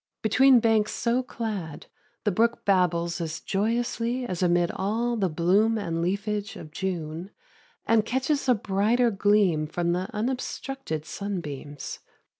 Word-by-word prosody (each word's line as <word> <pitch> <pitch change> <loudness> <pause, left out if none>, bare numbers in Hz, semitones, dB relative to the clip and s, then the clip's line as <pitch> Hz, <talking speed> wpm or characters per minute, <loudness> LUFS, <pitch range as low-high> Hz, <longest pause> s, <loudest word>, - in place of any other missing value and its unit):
Between 255 +4 +6
banks 220 -2 +2
so 235 +2 +1
clad 210 - -5 0.4
the 210 - +2
brook 230 +5 +1
babbles 170 -3 +2
as 160 -1 -3
joyously 235 +4 -1
as 180 -6 -4
amid 175 -1 +3
all 230 +5 -1
the 195 -5 +1
bloom 195 +8 +2
and 165 -5 -2
leafage 205 +3 -2
of 155 - -10
June, 170 0 -4 0.6
and 225 -1 +4
catches 265 +4 0
a 250 - +6
brighter 215 +4 +2
gleam 195 -6 +2
from 170 +2 -1
the 180 +2 -1
unobstructed 250 - -3
sunbeams. 155 -7 -5
200 Hz, 130 wpm, -26 LUFS, 170-230 Hz, 0.6 s, Between